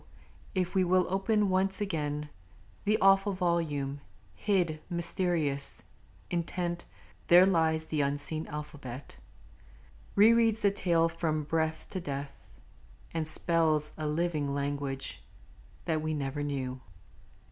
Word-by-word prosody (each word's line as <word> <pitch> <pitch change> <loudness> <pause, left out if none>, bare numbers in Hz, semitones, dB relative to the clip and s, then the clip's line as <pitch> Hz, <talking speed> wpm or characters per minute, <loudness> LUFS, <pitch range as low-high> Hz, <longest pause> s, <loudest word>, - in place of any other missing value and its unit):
if 180 -2 0
we 190 -1 +3
will 185 0 +3
open 205 +2 +2
once 190 0 +2
again 150 -7 -2 0.6
The 210 +1 +3
awful 195 0 +4
volume, 155 -6 -1 0.3
hid, 175 -7 0
mysterious, 170 -5 +1 0.5
Intent, 175 0 -2 0.4
there 175 +2 +8
lies 160 -4 +2
the 155 -1 -1
unseen 145 +3 -1
alphabet 145 -4 -8 1.0
Re 215 +3 +7
reads 225 -1 +3
the 200 - +4
tale 170 -4 +2
from 165 -2 -1
breath 160 +1 -1
to 190 - -3
death, 140 -2 -6 0.6
and 160 -2 -1
spells 155 -2 +2
A 155 -1 -3
living 150 -3 -1
language 140 -1 -3 0.6
that 160 -2 0
we 155 0 -2
never 140 0 -3
knew. 130 -3 -3
160 Hz, 115 wpm, -30 LUFS, 145-185 Hz, 1.0 s, there